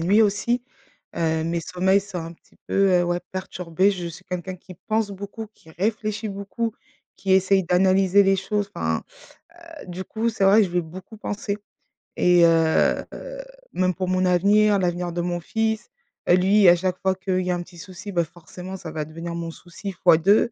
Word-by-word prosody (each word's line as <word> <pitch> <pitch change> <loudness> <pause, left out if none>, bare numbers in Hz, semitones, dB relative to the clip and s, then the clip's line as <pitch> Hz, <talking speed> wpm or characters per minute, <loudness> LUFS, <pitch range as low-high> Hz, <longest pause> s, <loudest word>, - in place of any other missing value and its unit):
nuit 200 +7 +4
aussi, 235 +4 +1 0.5
heu, 160 -1 0
mes 170 +1 -1
sommeils 185 +3 +2
sont 195 -2 -7
un 165 0 -6
petit 170 - -25
peu - - -3 0.3
heu, - - +2
ouais 175 0 0
perturbés. 185 0 0
Je 180 -3 -4
suis 170 - -9
quelqu'un 180 +1 -5
qui 185 0 -13
pense 220 -1 0
beaucoup, 200 +3 -7
qui 160 - -19
réfléchit 215 +4 -2
beaucoup, 200 +3 -3 0.4
qui 190 -1 -1
essaye 190 0 +4
d'analyser 190 +2 +4
les 195 0 +3
choses, 205 +1 -2
enfin, - - -1 0.8
heu, - - -10
du 180 +1 -5
coup 230 +1 -1
c'est 220 -3 0
vrai 200 +3 +6
que - - +3
je - - -10
vais 175 0 +1
beaucoup 185 +7 -11
penser, 205 -1 -4 0.6
et 175 -1 +5
heu 165 -1 +3
heu, - - -8 0.3
même 185 0 +1
pour 185 +1 -3
mon 185 0 +1
avenir, 200 +3 +4
l'avenir 175 -1 -1
de 175 - -4
mon 175 0 -2
fils. 220 +4 -2 0.4
Heu, 175 - +7
lui 195 +2 +4
à 175 - +7
chaque 185 0 -2
fois 190 0 +1
qu'il 185 -1 -1
y 180 - -1
a 180 - +1
un 175 - -3
petit 175 0 -17
souci, 185 +2 -9
bah, 170 -1 +2
forcément 180 +3 -9
ça 160 -3 -8
va 155 -1 -3
devenir 165 +2 -7
mon 170 -1 -4
souci 180 +4 -8
fois 175 -2 +4
2. 200 +7 +3
185 Hz, 200 wpm, -23 LUFS, 175-200 Hz, 0.8 s, Heu